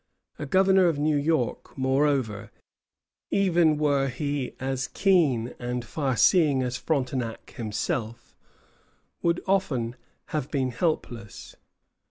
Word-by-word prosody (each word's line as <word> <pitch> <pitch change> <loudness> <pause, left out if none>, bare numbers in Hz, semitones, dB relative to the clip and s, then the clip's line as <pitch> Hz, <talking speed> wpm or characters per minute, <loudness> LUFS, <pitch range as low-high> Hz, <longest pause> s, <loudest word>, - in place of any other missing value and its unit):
A 145 - -4
governor 190 +2 +4
of 165 -4 +1
New 150 +1 +1
York, 145 -4 -1
moreover, 130 -5 0 0.8
even 175 -5 +3
were 145 -2 +2
he 140 0 -3
as 130 0 -2
keen 150 - +2
and 125 0 -3
far 135 -1 -2
seeing 150 - +4
as 125 0 -2
Frontenac 125 -5 -2
himself, 115 +1 -4 0.9
would 170 0 0
often 145 -12 0 0.4
have 150 -3 -2
been 130 -4 -1
helpless. 120 - -3
135 Hz, 110 wpm, -26 LUFS, 125-160 Hz, 0.9 s, governor